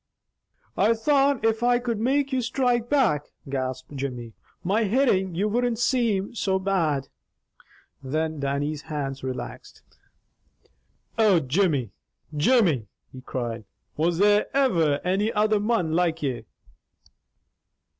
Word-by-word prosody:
"I 220 Hz, +4 st, +3 dB
thought 275 Hz, 0 st, +2 dB
if 225 Hz, 0 st, +1 dB
I 245 Hz, 0 st, +3 dB
could 240 Hz, -3 st, -3 dB
make 275 Hz, +4 st, +1 dB
you 260 Hz, -, +1 dB
strike 240 Hz, -1 st, 0 dB
back," 215 Hz, -, +2 dB, 0.2 s
gasped 130 Hz, 0 st, -4 dB
Jimmy, 125 Hz, -4 st, -5 dB, 0.3 s
"my 210 Hz, +5 st, +1 dB
hittin' 195 Hz, -6 st, +1 dB
you 200 Hz, +5 st, +1 dB
wouldn't 240 Hz, +2 st, 0 dB
same 230 Hz, -4 st, 0 dB
so 195 Hz, -4 st, 0 dB
bad." 170 Hz, -8 st, 0 dB, 0.9 s
Then 155 Hz, +3 st, -2 dB
Dannie's 140 Hz, +2 st, -2 dB
hands 140 Hz, -4 st, -5 dB
relaxed. 130 Hz, -1 st, -7 dB, 1.4 s
"Oh, 205 Hz, -6 st, +5 dB
Jimmy! 140 Hz, -, 0 dB, 0.4 s
Jimmy!" 155 Hz, -, +3 dB, 0.3 s
he 130 Hz, -, -9 dB
cried. 120 Hz, -3 st, -4 dB, 0.3 s
"Was 165 Hz, +2 st, 0 dB
there 205 Hz, +2 st, +4 dB
ever 165 Hz, -, +2 dB
any 195 Hz, +5 st, +1 dB
other 215 Hz, 0 st, +2 dB
mon 210 Hz, -6 st, 0 dB
like 165 Hz, -1 st, 0 dB
ye?" 125 Hz, -5 st, -3 dB
190 Hz, 115 wpm, -25 LUFS, 145-230 Hz, 1.4 s, Oh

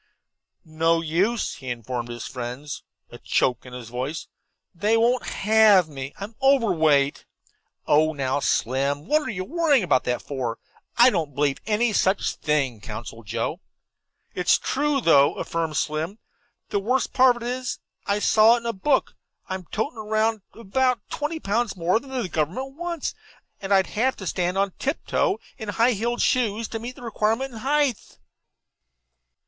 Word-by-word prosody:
"No 165 Hz, +1 st, +1 dB
use," 185 Hz, +9 st, 0 dB
he 130 Hz, -2 st, -8 dB
informed 120 Hz, 0 st, -4 dB
his 120 Hz, -1 st, -6 dB
two -, -, -8 dB
friends, 125 Hz, +3 st, -5 dB, 0.3 s
a -, -, -10 dB
choke 125 Hz, 0 st, 0 dB
in 125 Hz, -, -11 dB
his 125 Hz, -2 st, -8 dB
voice. 130 Hz, +6 st, -4 dB, 0.5 s
"They 210 Hz, +5 st, +2 dB
won't 240 Hz, +2 st, +2 dB
have 210 Hz, -4 st, +5 dB
me. 135 Hz, -2 st, -7 dB
I'm 205 Hz, +3 st, -6 dB
overweight." 160 Hz, -, +3 dB, 0.6 s
"Oh, 155 Hz, +2 st, +4 dB
now, 135 Hz, -2 st, -1 dB
Slim, 140 Hz, +3 st, 0 dB
what 305 Hz, -, +2 dB
are 300 Hz, -, -5 dB
you 190 Hz, -4 st, -3 dB
worrying 300 Hz, -, +2 dB
about 165 Hz, -7 st, +2 dB
that 125 Hz, 0 st, -1 dB
for? 125 Hz, -5 st, -3 dB, 0.4 s
I 245 Hz, +2 st, +7 dB
don't 155 Hz, -, -2 dB
believe 140 Hz, -1 st, +1 dB
any 220 Hz, +1 st, +2 dB
such 195 Hz, 0 st, +2 dB
thing," 135 Hz, -7 st, -1 dB
counseled 115 Hz, +1 st, -8 dB
Joe. 115 Hz, +2 st, -2 dB, 0.7 s
"It's 180 Hz, -1 st, +3 dB
true, 285 Hz, 0 st, 0 dB
though," 140 Hz, -7 st, +5 dB
affirmed 165 Hz, -3 st, -2 dB
Slim. 155 Hz, +4 st, -1 dB, 0.5 s
"That's -, -, -40 dB
the 200 Hz, -, +1 dB
worst 250 Hz, +7 st, 0 dB
part 255 Hz, -1 st, +5 dB
of 235 Hz, -, -8 dB
it; 250 Hz, +1 st, -3 dB, 0.3 s
I 200 Hz, -, +2 dB
saw 215 Hz, +2 st, +5 dB
it 240 Hz, -, -3 dB
in -, -, -16 dB
the 235 Hz, 0 st, -2 dB
book. 265 Hz, +8 st, +1 dB, 0.4 s
I'm 190 Hz, -1 st, -4 dB
toting 220 Hz, -, -3 dB
around 220 Hz, 0 st, 0 dB
about 250 Hz, +3 st, 0 dB
twenty 305 Hz, +2 st, -3 dB
pounds 220 Hz, -2 st, -1 dB
more 175 Hz, +5 st, +2 dB
than 275 Hz, -, -14 dB
the 250 Hz, -6 st, -2 dB
government 180 Hz, -, -2 dB
wants, 340 Hz, -1 st, -3 dB, 0.5 s
and 195 Hz, 0 st, -5 dB
I'd 190 Hz, -1 st, +5 dB
have 255 Hz, +5 st, 0 dB
to 190 Hz, -, -9 dB
stand 180 Hz, +1 st, -1 dB
on 195 Hz, 0 st, +1 dB
tiptoe 330 Hz, +7 st, 0 dB, 0.2 s
in 220 Hz, -2 st, -5 dB
high 230 Hz, +4 st, +3 dB
heel 235 Hz, +2 st, -1 dB
shoes 230 Hz, -4 st, +1 dB
to 225 Hz, -, -4 dB
meet 245 Hz, +3 st, -7 dB
the -, -, -13 dB
requirement 225 Hz, +3 st, -1 dB
in 225 Hz, -, -8 dB
height." 275 Hz, -1 st, 0 dB
200 Hz, 165 wpm, -24 LUFS, 145-240 Hz, 0.7 s, I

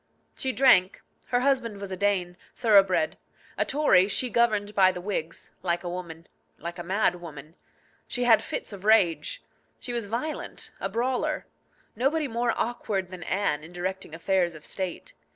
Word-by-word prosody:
She 260 Hz, -, -1 dB
drank. 245 Hz, -8 st, +5 dB, 0.3 s
Her 245 Hz, 0 st, +1 dB
husband 250 Hz, -6 st, +1 dB
was 200 Hz, -1 st, -6 dB
a -, -, -2 dB
Dane, 185 Hz, -2 st, 0 dB, 0.2 s
thoroughbred. 205 Hz, +5 st, +3 dB, 0.4 s
A -, -, +2 dB
Tory, 270 Hz, -10 st, +4 dB
she 245 Hz, +4 st, -1 dB
governed 210 Hz, -3 st, +2 dB
by 190 Hz, -2 st, +5 dB
the 180 Hz, -, -6 dB
Whigs 175 Hz, -4 st, -4 dB
like 175 Hz, -1 st, 0 dB
a 175 Hz, -, -3 dB
woman, 170 Hz, -2 st, -7 dB, 0.3 s
like 170 Hz, +1 st, -7 dB
a -, -, -4 dB
mad 180 Hz, -1 st, +1 dB
woman. 155 Hz, -2 st, -10 dB, 0.5 s
She 245 Hz, -, -2 dB
had 230 Hz, -3 st, +6 dB
fits -, -, -4 dB
of 195 Hz, -1 st, -9 dB
rage. 220 Hz, -, +3 dB, 0.4 s
She 245 Hz, -, -5 dB
was 235 Hz, -3 st, -2 dB
violent, 245 Hz, +9 st, -4 dB
a -, -, -2 dB
brawler. 250 Hz, +2 st, -1 dB, 0.5 s
Nobody 285 Hz, +6 st, +1 dB
more 235 Hz, -1 st, 0 dB
awkward 200 Hz, -5 st, -2 dB
than 185 Hz, -1 st, -8 dB
Anne 165 Hz, -5 st, -1 dB
in 165 Hz, +3 st, -12 dB
directing 185 Hz, -1 st, -4 dB
affairs 175 Hz, -1 st, +1 dB
of 155 Hz, -, -11 dB
state. 190 Hz, -, -4 dB
200 Hz, 165 wpm, -27 LUFS, 175-240 Hz, 0.5 s, had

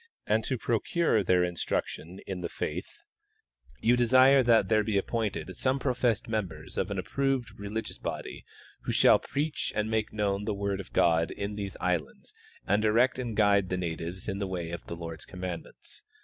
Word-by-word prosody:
and -, -, +2 dB
to -, -, -1 dB
procure 170 Hz, -, +1 dB
their 90 Hz, 0 st, +3 dB
instruction 90 Hz, 0 st, -3 dB
in 95 Hz, -2 st, -4 dB
the -, -, -3 dB
faith, -, -, -5 dB, 0.8 s
you 120 Hz, +2 st, +4 dB
desire 130 Hz, +3 st, +6 dB
that 115 Hz, -5 st, +4 dB
there 110 Hz, +1 st, +3 dB
be 105 Hz, -1 st, 0 dB
appointed 105 Hz, -3 st, -2 dB
some 130 Hz, +1 st, +1 dB
professed 125 Hz, -3 st, 0 dB
members 95 Hz, -9 st, -4 dB
of -, -, -1 dB
an 100 Hz, -, -3 dB
approved 130 Hz, +7 st, -1 dB
religious 105 Hz, +2 st, -5 dB
body -, -, -5 dB, 0.4 s
who -, -, -3 dB
shall -, -, +6 dB
preach 150 Hz, +2 st, -2 dB
and 105 Hz, +1 st, 0 dB
make 110 Hz, -1 st, 0 dB
known 100 Hz, -1 st, 0 dB
the 105 Hz, -2 st, -1 dB
word 100 Hz, -1 st, -2 dB
of 95 Hz, -, -8 dB
God 80 Hz, -1 st, +3 dB
in 100 Hz, +1 st, -4 dB
these 100 Hz, -2 st, -5 dB
islands 85 Hz, -5 st, -2 dB, 0.3 s
and 100 Hz, +2 st, +2 dB
direct 120 Hz, +4 st, +3 dB
and 120 Hz, -4 st, -4 dB
guide 100 Hz, -3 st, +4 dB
the 90 Hz, -, -1 dB
natives 85 Hz, +1 st, -4 dB
in 100 Hz, -1 st, -2 dB
the 100 Hz, -, -1 dB
way 85 Hz, -3 st, -4 dB
of 85 Hz, -, -5 dB
the 85 Hz, -, -5 dB
Lord's 80 Hz, -2 st, -7 dB
commandments. 90 Hz, -3 st, -7 dB
100 Hz, 175 wpm, -29 LUFS, 90-115 Hz, 0.8 s, desire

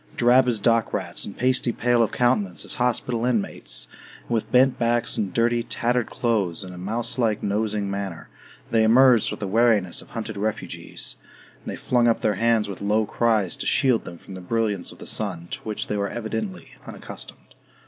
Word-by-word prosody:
Drab 125 Hz, +2 st, +5 dB
as 120 Hz, -3 st, +1 dB
dock 115 Hz, +1 st, +2 dB
rats, -, -, -3 dB
and 100 Hz, -, -9 dB
pasty 130 Hz, -1 st, +2 dB
pale 120 Hz, 0 st, +2 dB
of 115 Hz, -, +1 dB
countenance 115 Hz, -7 st, 0 dB
as -, -, -1 dB
hospital 125 Hz, -1 st, 0 dB
inmates, 100 Hz, -, -1 dB, 0.3 s
and -, -, -15 dB
with 115 Hz, -2 st, -1 dB
bent 130 Hz, 0 st, +4 dB
backs 120 Hz, 0 st, +2 dB
and 100 Hz, -3 st, 0 dB
dirty, 120 Hz, +1 st, +2 dB
tattered 120 Hz, +1 st, 0 dB
clothes 105 Hz, -7 st, -1 dB
and 90 Hz, -1 st, -9 dB
a -, -, -10 dB
mouse 110 Hz, +7 st, -1 dB
like 110 Hz, -3 st, +1 dB
nosing 105 Hz, 0 st, -1 dB
manner, 100 Hz, -4 st, -5 dB, 0.4 s
they 115 Hz, -, +4 dB
emerged 120 Hz, +1 st, +5 dB
with -, -, -5 dB
the 100 Hz, -, -2 dB
wariness 105 Hz, -3 st, +2 dB
of -, -, -16 dB
hunted 110 Hz, -2 st, -5 dB
refugees; 105 Hz, +2 st, -4 dB, 0.5 s
and -, -, -7 dB
they -, -, -5 dB
flung 120 Hz, -1 st, +1 dB
up 115 Hz, -, +2 dB
their 105 Hz, -, +2 dB
hands 115 Hz, +1 st, +2 dB
with 100 Hz, -, -7 dB
low 105 Hz, +2 st, +2 dB
cries 110 Hz, -4 st, +1 dB
to -, -, -4 dB
shield 125 Hz, -4 st, +2 dB
them 85 Hz, -, -8 dB
from 95 Hz, -, -12 dB
the 95 Hz, -, -8 dB
brilliance 105 Hz, -1 st, -1 dB
of -, -, -14 dB
the -, -, -10 dB
sun, 95 Hz, -6 st, -1 dB
to -, -, -3 dB
which 110 Hz, -1 st, -3 dB
they 105 Hz, -, -3 dB
were 100 Hz, 0 st, -1 dB
evidently 110 Hz, -6 st, -5 dB, 0.2 s
unaccustomed. -, -, -8 dB
110 Hz, 195 wpm, -24 LUFS, 100-120 Hz, 0.5 s, Drab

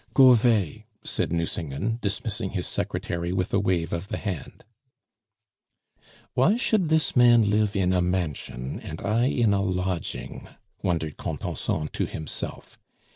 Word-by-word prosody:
"Go 130 Hz, -2 st, +9 dB
'vay," 110 Hz, -3 st, +2 dB, 0.2 s
said -, -, -2 dB
Nucingen, 85 Hz, -, -2 dB
dismissing 105 Hz, -1 st, -2 dB
his 90 Hz, -, -1 dB
secretary 85 Hz, +1 st, -2 dB
with 90 Hz, -1 st, -1 dB
a 100 Hz, -, +4 dB
wave 90 Hz, -5 st, 0 dB
of 85 Hz, +3 st, -3 dB
the -, -, -3 dB
hand. 95 Hz, -7 st, -5 dB, 1.7 s
"Why 160 Hz, -, +4 dB
should 215 Hz, -8 st, +1 dB
this 160 Hz, -1 st, +2 dB
man 120 Hz, -3 st, +6 dB
live 105 Hz, 0 st, +2 dB
in 95 Hz, -2 st, +2 dB
a 90 Hz, -, +3 dB
mansion 80 Hz, -8 st, -2 dB
and -, -, -7 dB
I 110 Hz, +4 st, +1 dB
in 120 Hz, -5 st, +2 dB
a 100 Hz, -, +2 dB
lodging?" 90 Hz, -2 st, -3 dB, 0.3 s
wondered 80 Hz, -4 st, -1 dB
Contenson 75 Hz, -1 st, -3 dB
to -, -, -2 dB
himself. 80 Hz, -1 st, -6 dB
100 Hz, 135 wpm, -26 LUFS, 85-115 Hz, 1.7 s, Go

